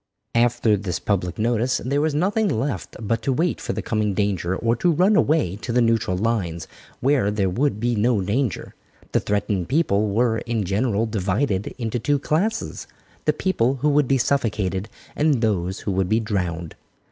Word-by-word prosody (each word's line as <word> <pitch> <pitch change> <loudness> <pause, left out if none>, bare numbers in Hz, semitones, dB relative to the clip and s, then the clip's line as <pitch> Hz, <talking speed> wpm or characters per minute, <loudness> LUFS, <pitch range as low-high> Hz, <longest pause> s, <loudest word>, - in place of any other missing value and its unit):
After 120 -2 +3
this 95 -3 -3
public 90 -4 -1
notice 120 +3 +1
there 140 +3 +1
was 155 -1 0
nothing 200 +6 +1
left 110 - -2
but 115 +1 -1
to 125 - 0
wait 165 +7 0
for - - -3
the - - -4
coming 105 -3 0
danger 95 -3 0
or 115 +4 +1
to 175 - +2
run 180 +6 +3
away 150 - +2
to 120 - -5
the 125 - +2
neutral 115 -6 +2
lines, 90 -6 -1 0.3
where 130 -6 +2
there 100 -3 0
would 125 +2 0
be 120 +2 0
no 115 +1 +2
danger. 105 +5 -2 0.4
The - - +3
threatened 100 -3 -1
people 110 -9 +2
were, 110 +2 +1
in 115 -2 -2
general, 105 +3 0
divided 100 0 -1
into 115 -1 -2
two 145 +6 +1
classes 165 +10 -1 0.4
"the - - +3
people 135 -9 +1
who 150 - +4
would 145 -2 +3
be 135 - +3
suffocated 110 -7 0 0.3
and 145 -5 +2
those 95 -3 0
who 100 - -2
would 95 -1 0
be 110 - +3
drowned." 90 -7 -3
115 Hz, 180 wpm, -23 LUFS, 100-135 Hz, 0.4 s, who